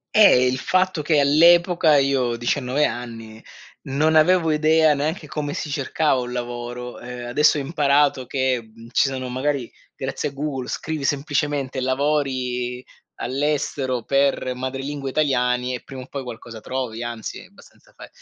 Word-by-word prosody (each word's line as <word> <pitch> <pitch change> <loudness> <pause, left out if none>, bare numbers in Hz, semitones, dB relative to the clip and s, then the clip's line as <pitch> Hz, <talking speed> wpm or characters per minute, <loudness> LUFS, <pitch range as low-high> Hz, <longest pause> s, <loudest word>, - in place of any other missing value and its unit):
Eh, 200 -12 +7
il 130 +1 0
fatto 185 -1 +1
che 150 0 +2
all'epoca 165 +2 +5
io, 135 -3 +1
19 130 +4 0
anni 115 -2 -6 0.4
non 155 +4 +1
avevo 165 +1 +4
idea 155 0 +4
neanche 155 +3 -2
come 145 0 -4
si 150 - -4
cercava 140 0 +1
un 125 0 -5
lavoro, 120 0 -5
ehm, 125 0 -7
adesso 150 +4 +4
ho - - -1
imparato 140 -3 +2
che 130 -4 -1 0.2
ci 135 - +3
sono 130 -1 -4
magari, 130 0 -2 0.2
grazie - - -3
a - - -14
Google 140 -3 -4
scrivi 155 -2 -4
semplicemente 140 -1 -1
lavori 130 -2 -1 0.3
all'estero 135 -2 -1
per 135 -1 +1
madrelingua 135 +2 -4
italiani 125 -3 +1
e 125 - -5
prima 135 -1 -9
o - - -12
poi 140 - -5
qualcosa 120 -2 -9
trovi, 125 -3 -4
anzi 120 -2 -6
è - - -12
abbastanza - - -20
fa - - -10
135 Hz, 150 wpm, -22 LUFS, 125-150 Hz, 0.4 s, Eh